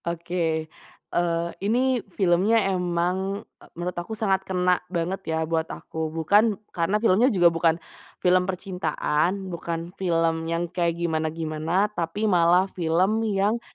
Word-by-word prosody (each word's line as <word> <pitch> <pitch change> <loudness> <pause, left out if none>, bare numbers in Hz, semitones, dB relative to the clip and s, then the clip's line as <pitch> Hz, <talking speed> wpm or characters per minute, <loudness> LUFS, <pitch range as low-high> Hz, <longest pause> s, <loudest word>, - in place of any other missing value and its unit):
Oke, 170 -1 -1 0.5
eee, 170 -1 0
ini 245 +4 +1 0.2
filmnya 190 +4 +3 0.2
emang, 180 +3 -1 0.2
e - - -15
menurut 175 +1 -3
aku 220 +5 -6
sangat 195 -4 +1
kena 180 -1 +2
banget 180 +2 -2
ya 160 - 0
buat 160 0 -1
aku, 160 -1 -5
bukan 200 +7 +3 0.2
karena 175 +4 +1
filmnya 225 +3 +4
juga 175 -7 +4
bukan 165 0 +2 0.4
film 180 +1 +2
percintaan, 185 -1 -1
bukan 170 0 -5
film 165 -3 0
yang 165 +1 0
kayak 170 -1 0
gimana-gimana 160 +2 -1
tapi 175 +4 -2
malah 180 -2 +4
film 185 +5 +1
yang 205 +3 +1
175 Hz, 130 wpm, -25 LUFS, 165-195 Hz, 0.5 s, filmnya